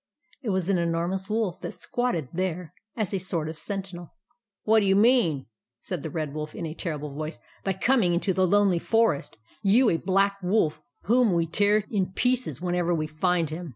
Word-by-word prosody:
It 240 - -4
was 190 -3 0
an 195 -3 +2
enormous 170 +3 -1
wolf 215 -5 -1
that - - -6
squatted 210 - -2
there 180 -1 -3 0.2
as 210 -3 -1
a 195 - 0
sort 170 -4 -2
of 160 - -5
sentinel. 190 -4 -6 0.2
" 220 -4 -66
What 220 +1 +5
do 200 - +1
you 195 - +4
mean," 205 - +3 0.3
said 180 +2 -5
the 160 - -5
Red 155 -2 -3
Wolf, 155 0 -5
in 170 - -4
a 155 - -4
terrible 150 -4 -4
voice, 155 +2 -5 0.3
"by 195 - 0
coming 190 -3 +2
into 190 +2 0
the 185 0 +2
Lonely 200 -2 +3
Forest, 225 - +1 0.2
— - - -31
you 245 0 +5
a 165 - +2
Black 195 +3 +1
Wolf, 180 -5 +1 0.2
whom 235 -2 +3
we 170 -1 +2
tear 205 +5 +2
in 190 -3 -1
pieces 250 +4 0
whenever 175 -1 0
we 155 -1 -1
find 165 +1 0
him 170 +1 -5
180 Hz, 200 wpm, -26 LUFS, 165-205 Hz, 0.3 s, What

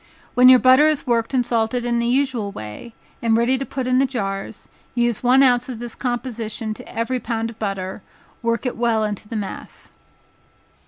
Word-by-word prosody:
When 250 +1 +7
your 255 - +9
butter 255 +5 +6
is 305 -2 0
worked 230 -2 0
and 255 -2 +1
salted 235 +1 0
in 240 -1 +1
the 235 - 0
usual 250 -5 0
way, 110 - -9 0.3
and 225 -1 +2
ready 235 +3 +2
to 275 - -3
put 260 -2 -4
in 255 0 +2
the 270 - +3
jars, 195 -4 -4 0.3
use 240 -2 +1
one 255 +2 +5
ounce 250 -1 +3
of 250 - -5
this 240 0 -6
composition 235 -3 -3
to - - -12
every 250 +3 -2
pound 230 -1 -3
of 225 - -17
butter, 195 -2 -4 0.4
work 230 +1 -1
it 250 - -2
well 230 -2 +1
into 210 0 -4
the 230 - -5
mass. 205 -3 -6
235 Hz, 195 wpm, -21 LUFS, 220-255 Hz, 0.4 s, your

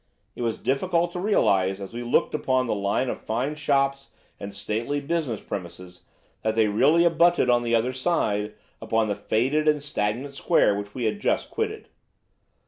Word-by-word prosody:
It - - -7
was 115 -2 -1
difficult 170 +5 0
to 180 - -5
realise 95 - +2
as 100 +2 -8
we 120 - -5
looked 120 0 +1
at 150 - -2
the 130 -1 +2
line 100 +5 0
of - - -4
fine 125 +7 -2
shops 140 -2 0 0.3
and 100 - -6
stately 110 +8 -2
business 145 -6 -2
premises 90 -1 -8 0.4
that 110 0 -1
they 110 -1 +3
really 145 +11 +4
abutted 170 -5 +4
on 120 0 +3
the 120 -1 +1
other 120 +3 +1
side 110 -8 -1 0.3
upon 110 -1 0
the 100 - 0
faded 135 +11 0
and 150 -2 +2
stagnant 130 0 -2
square 105 -6 +2
which 100 0 -6
we 125 - -3
had 115 - -1
just - - -1
quitted. 440 -1 -3
125 Hz, 175 wpm, -25 LUFS, 105-150 Hz, 0.4 s, really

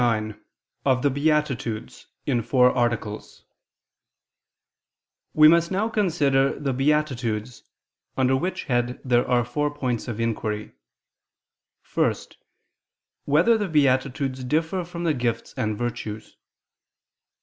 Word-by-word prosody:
________________________ - - +3
QUESTION 110 -2 -1 0.4
69 135 -2 +2
OF 125 - -5
THE 145 - +4
BEATITUDES 135 -6 -1 0.2
(In 125 -4 +1
Four 125 +2 +4
Articles) 115 -4 -2 1.9
We 155 0 +8
must 170 +1 +4
now 200 +4 0
consider 145 -12 +1
the 140 -2 -1
beatitudes: 125 -5 -1 0.6
under 130 0 +3
which 180 +8 -2
head 120 -2 -1
there 120 -1 +2
are 120 -2 +2
four 145 +5 -1
points 130 -6 -3
of 115 -2 -5
inquiry: 110 -2 -2 1.2
(1) - - +2 1.1
Whether 170 +11 +4
the 205 - -1
beatitudes 135 -2 +1
differ 160 +7 0
from 170 0 -7
the 165 -2 +2
gifts 120 -3 -2
and 110 -1 -2
virtues? 110 -2 -5
130 Hz, 115 wpm, -24 LUFS, 120-150 Hz, 1.9 s, We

